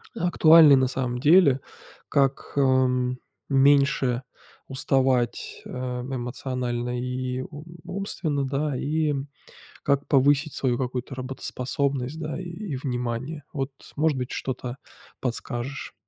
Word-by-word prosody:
актуальный 165 Hz, -6 st, +7 dB
на 130 Hz, -1 st, +3 dB
самом 125 Hz, -1 st, -2 dB
деле: 145 Hz, -2 st, +6 dB, 0.5 s
как, 135 Hz, -1 st, +1 dB
ам, 130 Hz, -2 st, +2 dB, 0.3 s
меньше 135 Hz, -2 st, +3 dB, 0.4 s
уставать, 130 Hz, -2 st, +1 dB
э, -, -, -10 dB
эмоционально 125 Hz, -1 st, -3 dB
и 125 Hz, 0 st, -3 dB
у 145 Hz, +2 st, -9 dB, 0.2 s
умственно, 175 Hz, -7 st, -2 dB
да, 140 Hz, +1 st, -1 dB
и, 155 Hz, +3 st, 0 dB
м, 140 Hz, -1 st, -2 dB, 0.6 s
как 140 Hz, 0 st, +1 dB
повысить 145 Hz, +2 st, +3 dB
свою 125 Hz, -3 st, 0 dB
какую-то 130 Hz, +1 st, -3 dB
работоспособность, 135 Hz, +2 st, -3 dB
да, 155 Hz, 0 st, -4 dB
и 180 Hz, -, -7 dB
и 175 Hz, -2 st, -5 dB
внимание? 130 Hz, +3 st, -3 dB
Вот, 135 Hz, -1 st, -2 dB, 0.2 s
может 150 Hz, -2 st, +2 dB
быть 125 Hz, 0 st, -4 dB
что-то 125 Hz, -1 st, -4 dB, 0.4 s
подскажешь? 125 Hz, +2 st, -4 dB
135 Hz, 110 wpm, -25 LUFS, 125-145 Hz, 0.6 s, актуальный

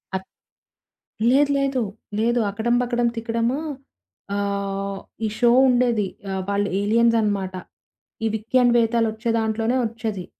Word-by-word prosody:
అ -, -, +2 dB, 1.1 s
లేదు, 285 Hz, +2 st, +4 dB
లేదు. 275 Hz, -2 st, 0 dB, 0.4 s
లేదు. 235 Hz, +2 st, +2 dB
'అకడం, 220 Hz, +4 st, -1 dB
బకడం, 240 Hz, -1 st, +1 dB
తికడము' 230 Hz, +3 st, -1 dB, 0.8 s
ఆహ్, 200 Hz, -1 st, -2 dB, 0.3 s
ఈ -, -, +1 dB
షో 240 Hz, -1 st, +5 dB, 0.2 s
ఉండేది. 240 Hz, -5 st, +2 dB, 0.2 s
ఆహ్, 190 Hz, -, -2 dB
వాళ్ళు 200 Hz, 0 st, 0 dB
ఏలియన్సనమాట. 215 Hz, -3 st, +2 dB, 0.7 s
ఈ -, -, +3 dB
'విక్యాన్ 240 Hz, +3 st, +2 dB
వేతాలు' 230 Hz, -1 st, +2 dB
ఒచ్చే 220 Hz, +2 st, -4 dB
దాంట్లోనే 225 Hz, +2 st, 0 dB
ఒచ్చేది. 220 Hz, -5 st, -4 dB
225 Hz, 115 wpm, -23 LUFS, 205-240 Hz, 1.1 s, షో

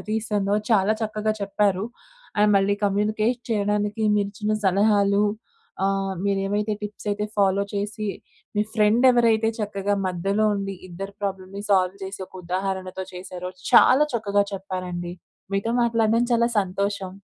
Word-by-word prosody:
దారితీస్తుందో 210 Hz, -2 st, -1 dB, 0.2 s
చాలా 210 Hz, -1 st, +4 dB
చక్కగా 215 Hz, 0 st, -1 dB
చెప్పారు. 200 Hz, -1 st, +1 dB, 0.6 s
అండ్ 210 Hz, 0 st, +5 dB
మళ్ళీ 195 Hz, +1 st, +3 dB
కమ్యూనికేట్ 215 Hz, +4 st, +1 dB
చేయడానికి, 210 Hz, 0 st, 0 dB
మీరు 205 Hz, -1 st, +1 dB
ఇచ్చిన 210 Hz, +1 st, -1 dB
సలహాలు 200 Hz, +1 st, +3 dB, 0.6 s
ఆహ్, 195 Hz, 0 st, 0 dB
మీరు 200 Hz, -1 st, +1 dB
ఏమైతే 210 Hz, +2 st, 0 dB
టిప్స్ 210 Hz, 0 st, -7 dB
అయితే 210 Hz, +1 st, -1 dB
ఫాలో 200 Hz, 0 st, +3 dB
చేసి, 210 Hz, +1 st, -3 dB, 0.5 s
మీ 210 Hz, -, +4 dB
ఫ్రెండ్ 215 Hz, +3 st, +3 dB
ఎవరైతే 225 Hz, -2 st, +3 dB
చక్కగా 205 Hz, -1 st, -1 dB
మధ్యలో 195 Hz, +4 st, 0 dB
ఉండి, 195 Hz, -1 st, -3 dB
ఇద్దరి 195 Hz, +3 st, -7 dB
ప్రాబ్లమ్‌ని 195 Hz, 0 st, -4 dB
సాల్వ్ 185 Hz, -1 st, +3 dB
చేసి, 190 Hz, 0 st, -7 dB
ఒక -, -, -27 dB
ఉదాహరణతో 190 Hz, +1 st, -3 dB
చేసారో, 180 Hz, 0 st, -6 dB, 0.2 s
చాలా 275 Hz, +4 st, +7 dB
చక్కగా 205 Hz, -3 st, +1 dB
చెప్పారండి. 180 Hz, -2 st, -5 dB, 0.4 s
మీతో 200 Hz, +3 st, 0 dB
మాట్లాడడం 230 Hz, 0 st, +2 dB
చాలా 235 Hz, 0 st, +4 dB
సంతోషం. 200 Hz, 0 st, -2 dB
200 Hz, 130 wpm, -24 LUFS, 195-215 Hz, 0.6 s, చాలా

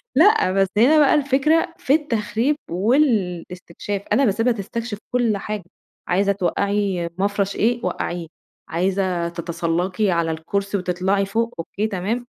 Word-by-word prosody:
لأ 385 Hz, -, +5 dB
بس 195 Hz, 0 st, +2 dB
هنا 275 Hz, +8 st, +6 dB
بقى 285 Hz, -, +5 dB
الفكرة 295 Hz, +4 st, +2 dB
في 270 Hz, -, +1 dB
التخريب 240 Hz, -2 st, 0 dB, 0.2 s
والاستكشاف، 195 Hz, -, 0 dB
أنا 275 Hz, -, +4 dB
باسيبها 225 Hz, +4 st, +2 dB
تستكشف 225 Hz, +1 st, -5 dB
كلّ 235 Hz, -4 st, +1 dB
حاجة، 210 Hz, -1 st, -5 dB, 0.4 s
عايزة 195 Hz, +3 st, +2 dB
توقّعي 200 Hz, -1 st, 0 dB
مَفرش 200 Hz, 0 st, 0 dB
إيه 235 Hz, +2 st, +1 dB
وقّعيه، 175 Hz, -1 st, -3 dB, 0.4 s
عايزة 180 Hz, -1 st, 0 dB
تتسلَّقي 175 Hz, +3 st, -1 dB
على 170 Hz, -1 st, +1 dB
الكرسي 200 Hz, +5 st, -2 dB
وتطلَعي 185 Hz, +2 st, 0 dB
فوق، 230 Hz, +4 st, -1 dB
أوكي 205 Hz, +6 st, -2 dB
تمام. 220 Hz, +5 st, -2 dB
200 Hz, 125 wpm, -21 LUFS, 180-235 Hz, 0.4 s, هنا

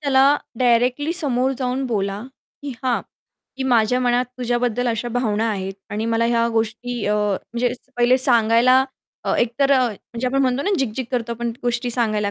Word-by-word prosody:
त्याला 280 Hz, 0 st, +4 dB, 0.2 s
डायरेक्टली 250 Hz, +5 st, +2 dB
समोर 265 Hz, -6 st, +1 dB
जाऊन 255 Hz, +1 st, -2 dB
बोला, 200 Hz, -3 st, -2 dB, 0.4 s
की 285 Hz, -, -5 dB
"हां, 255 Hz, -2 st, +1 dB, 0.6 s
की 265 Hz, -, -3 dB
माझ्या 245 Hz, -1 st, +2 dB
मनात 245 Hz, 0 st, +2 dB
तुझ्याबद्दल 245 Hz, 0 st, 0 dB
अशा 235 Hz, +1 st, -2 dB
भावना 225 Hz, -2 st, 0 dB
आहेत." 195 Hz, -2 st, -4 dB, 0.2 s
आणि 215 Hz, +2 st, -3 dB
मला 230 Hz, +1 st, +2 dB
ह्या 235 Hz, 0 st, +2 dB
गोष्टी 225 Hz, +1 st, -2 dB
अ, 210 Hz, -, +1 dB
म्हणजे 215 Hz, +4 st, -1 dB, 0.2 s
पहिले 245 Hz, +2 st, +4 dB
सांगायला 245 Hz, +1 st, +4 dB, 0.5 s
एकतर 260 Hz, +4 st, +1 dB
अ, 260 Hz, -2 st, +4 dB
म्हणजे 235 Hz, +3 st, -6 dB
आपण 275 Hz, +2 st, +1 dB
म्हणतो 260 Hz, +2 st, 0 dB
ना, 405 Hz, -, -1 dB
झिग-झिग 260 Hz, -1 st, -2 dB
करतो 240 Hz, -2 st, -2 dB
आपण 235 Hz, 0 st, -3 dB
गोष्टी 245 Hz, 0 st, -1 dB
सांगायला, 215 Hz, -4 st, +3 dB
240 Hz, 160 wpm, -21 LUFS, 225-255 Hz, 0.6 s, त्याला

